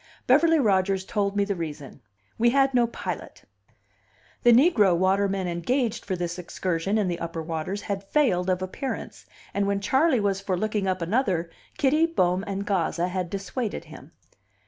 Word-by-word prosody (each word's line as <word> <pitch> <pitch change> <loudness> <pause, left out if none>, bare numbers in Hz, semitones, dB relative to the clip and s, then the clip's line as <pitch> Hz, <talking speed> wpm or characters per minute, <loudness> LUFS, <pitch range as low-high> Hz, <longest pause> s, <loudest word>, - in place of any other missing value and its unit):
Beverly 325 -1 +5
Rodgers 195 -6 +2
told 200 -2 -1
me 200 0 +2
the 200 - -1
reason: 155 -6 -7 0.4
we 235 +1 +5
had 270 +1 +3
no 240 -2 +3
pilot; 235 - -6 1.0
the 240 - +6
negro 230 - +5
Waterman 190 +1 +1
engaged 225 +7 -1
for 190 - -2
this 175 0 -4
excursion 180 +3 -2
in 210 -3 +1
the 175 -1 -2
upper 165 -1 -4
waters 165 +5 -4
had 200 -1 -3
failed 195 -8 +1
of 185 0 0
appearance, 255 +8 -6 0.3
and 200 0 0
when 200 0 0
Charley 265 +7 +2
was 200 -2 0
for 190 -2 -1
looking 210 0 -1
up 185 -2 -1
another, 180 -4 0 0.3
Kitty, 305 +4 +3
Bohm, 185 - +1
and 200 0 -3
Gazza 180 -2 0
had 180 -1 -3
dissuaded 200 +4 -4
him. - - -13
195 Hz, 165 wpm, -25 LUFS, 180-230 Hz, 1.0 s, the